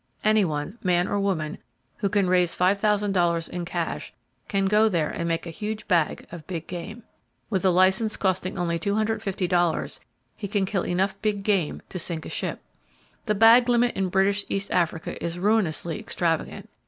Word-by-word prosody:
Anyone, 195 Hz, -2 st, +1 dB
man 180 Hz, -1 st, +2 dB
or 205 Hz, -, -1 dB
woman, 175 Hz, -6 st, -1 dB, 0.4 s
who 200 Hz, -, 0 dB
can 200 Hz, -1 st, +2 dB
raise 180 Hz, -1 st, +2 dB
$5,000 195 Hz, -3 st, +2 dB
in 175 Hz, -1 st, -4 dB
cash -, -, -3 dB, 0.4 s
can 195 Hz, -1 st, 0 dB
go 210 Hz, +3 st, +4 dB
there 165 Hz, -6 st, 0 dB
and 170 Hz, -, -3 dB
make 165 Hz, 0 st, -1 dB
a 170 Hz, -, -6 dB
huge 215 Hz, +5 st, -5 dB
"bag" 170 Hz, -6 st, +1 dB
of 170 Hz, -3 st, -9 dB
big 170 Hz, -4 st, -5 dB
game. 200 Hz, +6 st, -7 dB, 0.5 s
With 190 Hz, -2 st, 0 dB
a -, -, +6 dB
license 190 Hz, +4 st, +3 dB
costing 185 Hz, -1 st, -1 dB
only 170 Hz, -2 st, -1 dB
$250 195 Hz, -4 st, 0 dB, 0.4 s
he 205 Hz, -, -5 dB
can 200 Hz, -1 st, 0 dB
kill 190 Hz, -1 st, -2 dB
enough 190 Hz, +2 st, -1 dB
big 205 Hz, -2 st, -1 dB
game 195 Hz, -7 st, 0 dB
to 185 Hz, -, -5 dB
sink 165 Hz, -1 st, -1 dB
a -, -, -6 dB
ship. -, -, -4 dB, 0.6 s
The 210 Hz, -2 st, +1 dB
bag 230 Hz, +3 st, +6 dB
limit 240 Hz, 0 st, +3 dB
in 190 Hz, -1 st, 0 dB
British 195 Hz, +2 st, +2 dB
East 195 Hz, 0 st, -2 dB
Africa 170 Hz, -2 st, -1 dB
is 170 Hz, 0 st, -3 dB
ruinously 175 Hz, -5 st, 0 dB
extravagant. 165 Hz, -2 st, -2 dB
190 Hz, 165 wpm, -25 LUFS, 175-205 Hz, 0.6 s, a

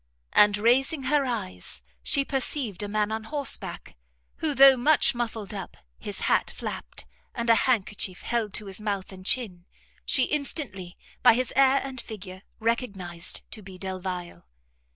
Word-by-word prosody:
And, 210 Hz, 0 st, +6 dB
raising 265 Hz, +7 st, +2 dB
her 280 Hz, +1 st, +2 dB
eyes, 210 Hz, -7 st, -5 dB, 0.2 s
she 280 Hz, -1 st, +2 dB
perceived 260 Hz, -, -1 dB
a 205 Hz, -, -3 dB
man 210 Hz, +1 st, 0 dB
on 220 Hz, 0 st, -3 dB
horseback, 285 Hz, -, -2 dB, 0.4 s
who, 305 Hz, -3 st, -1 dB
though 270 Hz, 0 st, +9 dB
much 285 Hz, +5 st, +3 dB
muffled 225 Hz, -4 st, -4 dB
up, 195 Hz, -3 st, -7 dB, 0.2 s
his -, -, -5 dB
hat -, -, +2 dB
flapped, 60 Hz, -, -7 dB, 0.3 s
and 235 Hz, 0 st, +2 dB
a 230 Hz, +3 st, +3 dB
handkerchief 205 Hz, -5 st, 0 dB
held 230 Hz, -3 st, -1 dB
to 215 Hz, -, -3 dB
his 195 Hz, +1 st, -8 dB
mouth 200 Hz, -3 st, -3 dB
and 185 Hz, -1 st, -11 dB
chin, 185 Hz, -5 st, -1 dB, 0.4 s
she 260 Hz, -, +3 dB
instantly, 250 Hz, -, -2 dB, 0.2 s
by 245 Hz, -3 st, +7 dB
his 255 Hz, +1 st, -1 dB
air 270 Hz, 0 st, +5 dB
and 265 Hz, -2 st, -5 dB
figure, 190 Hz, -4 st, -9 dB, 0.2 s
recognized 195 Hz, -7 st, -1 dB
to 220 Hz, -, -7 dB
be 190 Hz, -2 st, -11 dB
Delvile. 180 Hz, -, -6 dB
220 Hz, 150 wpm, -26 LUFS, 190-260 Hz, 0.4 s, though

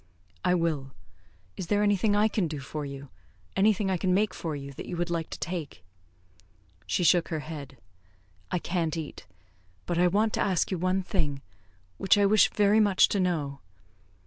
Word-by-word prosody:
"I 180 Hz, -, +3 dB
will. 155 Hz, -6 st, -1 dB, 0.6 s
Is 185 Hz, -, -5 dB
there 205 Hz, +2 st, +2 dB
anything 205 Hz, 0 st, +2 dB
I 210 Hz, +1 st, +4 dB
can 205 Hz, -4 st, 0 dB
do 150 Hz, -2 st, -5 dB
for 150 Hz, +2 st, -5 dB
you? 140 Hz, 0 st, -8 dB, 0.5 s
anything 200 Hz, 0 st, +2 dB
I 185 Hz, -, +1 dB
can 185 Hz, +1 st, +1 dB
make 205 Hz, 0 st, +1 dB
for 160 Hz, -3 st, -4 dB
you, 140 Hz, -1 st, -7 dB
that -, -, -8 dB
you 175 Hz, -, -4 dB
would 175 Hz, 0 st, -2 dB
like 165 Hz, -2 st, -2 dB
to -, -, -6 dB
take?" 170 Hz, -4 st, -5 dB, 1.0 s
She 95 Hz, -, 0 dB
shook 175 Hz, 0 st, +4 dB
her 160 Hz, -2 st, -3 dB
head. 145 Hz, -3 st, -8 dB, 0.7 s
"I 180 Hz, -, 0 dB
can't 170 Hz, -2 st, -2 dB
eat. 155 Hz, -2 st, -7 dB, 0.6 s
But 175 Hz, -1 st, -1 dB
I 180 Hz, -, +5 dB
want 210 Hz, +4 st, +1 dB
to -, -, 0 dB
ask 190 Hz, -2 st, +1 dB
you 185 Hz, -, -1 dB
one 185 Hz, +2 st, +1 dB
thing, 150 Hz, -8 st, -2 dB, 0.6 s
which 195 Hz, -, +4 dB
I 205 Hz, -, +4 dB
wish 210 Hz, +1 st, +5 dB
very 205 Hz, +1 st, +3 dB
much 205 Hz, -3 st, +4 dB
to 200 Hz, -, 0 dB
know." 155 Hz, -7 st, -1 dB
175 Hz, 185 wpm, -28 LUFS, 155-195 Hz, 1.0 s, I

